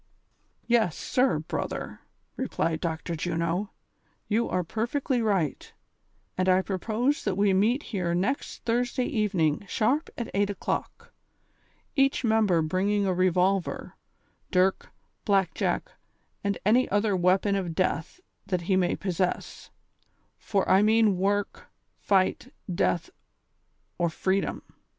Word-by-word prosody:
" - - -43 0.2
Yes, 225 -9 +2
sir, 250 -10 +1
brother," 155 - -4 0.4
replied 165 -1 -1
Dr. 165 0 -3
Juno, 170 +4 -1 0.3
" - - -42
you 225 +2 +1
are 180 - 0
perfectly 240 - -1
right, 195 -9 -1 0.6
and 185 0 +1
I 185 +1 +4
propose 230 - -1
that 200 -3 -1
we 200 -1 +3
meet 225 +9 +2
here 175 -3 0
next 205 +11 -2
Thursday 245 +2 0
eve 210 -4 -1
ning 155 0 +1
sharp 260 - +1
at 235 - -4
8 200 +1 +1
o'clock, 470 - -4 0.8
each 275 -1 +2
member 215 -7 +3
bringing 195 +5 +1
a 190 - +1
revolver, 185 +1 +1 0.5
dirk, 185 0 +1 0.3
black 195 -2 +2
jack - - -1 0.5
and 200 0 0
any 240 +5 +4
other 205 0 +1
weapon 185 +3 +2
of 180 -4 -2
death 185 - -1 0.3
that 180 -3 -1
he 185 +3 +1
may 180 -1 +2
possess, 185 -1 -3 0.7
for 195 -3 0
I 190 - +5
mean 215 -2 +4
work, 200 +1 -1 0.3
fight, 190 -2 +1 0.2
death, 170 0 0 0.9
or 170 -1 +2
freedom. 190 +4 -1
195 Hz, 125 wpm, -27 LUFS, 180-220 Hz, 0.9 s, I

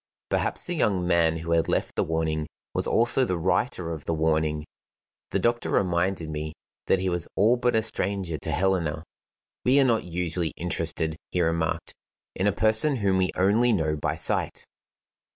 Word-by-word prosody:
Perhaps - - -1
the 175 - -2
young 95 - +1
man 85 -2 +3
who 85 +1 -5
had 85 -1 +2
left - - -1
the - - +2
warning 80 -1 -1 0.3
was - - +1
also 120 +3 +3
the 90 -8 0
writer 90 - 0
of 80 -3 -6
the 80 - -1
warning. 80 -1 0 0.6
The - - 0
doctor 120 0 0
reminded 90 -2 0
me 75 0 -4 0.3
that - - +4
he 95 0 -2
was 85 -2 -1
all 110 +5 +4
but 125 -1 +1
a 110 - +2
stranger 95 -6 -2
to - - -4
Helena. 85 -5 0 0.6
"We 130 +3 +4
are - - +6
not 115 -3 +2
usually 85 -1 -2
interested," 80 -2 -1
he 90 - -2
remarked, 80 -1 -1 0.4
"in 95 - 0
a - - +4
person 110 +9 +3
whom 100 -5 +1
we 90 -1 +2
only 105 +6 +3
know 80 -5 0
by 75 - -2
sight." - - -1
90 Hz, 175 wpm, -26 LUFS, 80-105 Hz, 0.6 s, are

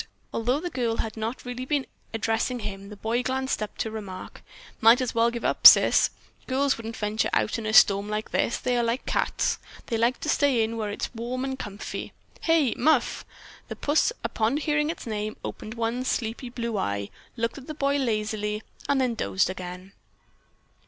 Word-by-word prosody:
Although 245 +5 +1
the 350 +2 -4
girl 235 -3 -1
had 220 - -3
not 225 +4 -4
really 245 +1 -4
been 280 0 0 0.3
addressing 225 +2 -1
him, 200 -1 -6
the 210 - -8
boy 225 +4 -1
glanced 265 -1 -1
up 215 - -5
to 220 - -2
remark: 200 -4 -8 0.4
"Might 230 +3 +7
as 255 -2 -1
well 230 +1 +3
give 235 0 -5
up, - - +8
Sis. - - +7 0.4
Girls 270 +1 +2
wouldn't 225 0 -7
venture 210 +1 0
out 215 - +1
in 220 - -4
a - - 0
storm 200 -1 +6
like 215 +1 -3
this; - - +1
they 250 -1 -1
are 240 - +2
like 235 +3 -1
cats. - - 0 0.3
They 230 - -1
like 235 +2 +2
to - - -4
stay 275 -7 +3
in 225 +1 -2
where 215 -2 -2
it's 205 - -4
warm 245 +3 -3
and 265 0 -4
comfy. 205 0 -6 0.3
Hey, 320 -7 +3
Muff?" 310 -4 +2 0.4
The - - -6
puss, 300 +9 +2
upon 225 +5 0
hearing 300 0 +1
its 330 - -5
name, 215 -1 -3
opened 220 +2 -6
one 230 +2 -1
sleepy 240 0 -2
blue 235 -3 -3
eye, 100 - -2 0.3
looked 230 +4 -2
at 260 - -14
the 310 - -6
boy 280 -1 +1
lazily 215 -3 -1 0.3
and 280 -1 +3
then 255 -2 +1
dozed 190 -4 0
again. 185 +1 -8
230 Hz, 190 wpm, -26 LUFS, 215-260 Hz, 0.4 s, up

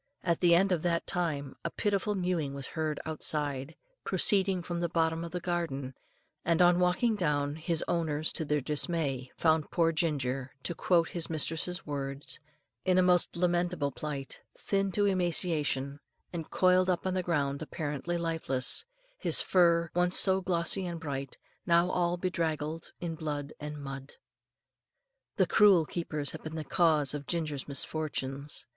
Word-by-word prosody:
At 170 -2 +1
the 170 -2 +5
end 195 +3 +3
of 175 -4 +1
that 170 -1 0
time, 150 -6 -2
a - - -1
pitiful 205 0 -1
mewing 175 -7 -1
was 140 -1 -7
heard 155 -2 -2
outside, 150 -2 -2 0.3
proceeding 195 -3 +2
from 175 0 -4
the 170 0 -1
bottom 160 -1 0
of 170 - -5
the 180 - -4
garden, 165 -7 -3 0.5
and 165 0 +1
on 175 0 +5
walking 180 +6 +2
down, 145 -6 0
his 160 0 0
owners, 155 -2 0
to - - 0
their 150 -1 0
dismay, 140 -3 0
found 160 -2 +2
poor 165 -2 +2
Ginger, 135 -5 -1
to 175 - -1
quote 170 -1 +2
his 170 -2 -4
mistress's 165 +3 -1
words, 140 -1 -4 0.4
"in 185 -1 +2
a 185 - +5
most 180 -1 +3
lamentable 175 -4 0
plight, 135 +1 -3 0.2
thin 195 -1 0
to 205 - +2
emaciation, 160 -7 +1 0.3
and 165 -2 -5
coiled 185 0 +3
up 180 0 0
on 185 - 0
the 185 - 0
ground 145 -5 -1
apparently 155 +1 -3
lifeless, 160 -6 -1 0.3
his - - +5
fur, 170 -2 +3
once 180 +1 +4
so 190 -1 +4
glossy 180 +1 +1
and 170 -1 -5
bright, 140 -4 -5 0.3
now 170 +1 +4
all 175 0 +1
bedraggled 165 -3 -2
in 170 -2 -3
blood 150 -3 -4
and 150 0 -6
mud." 135 -1 -8 1.2
The - - +3
cruel 195 -6 +5
keepers 150 -3 -2
had 160 - -8
been 155 0 -7
the 160 - -3
cause 155 -3 +2
of 145 -1 -6
Ginger's 155 -5 -3
misfortunes. 140 -1 -3
165 Hz, 160 wpm, -30 LUFS, 145-175 Hz, 1.2 s, the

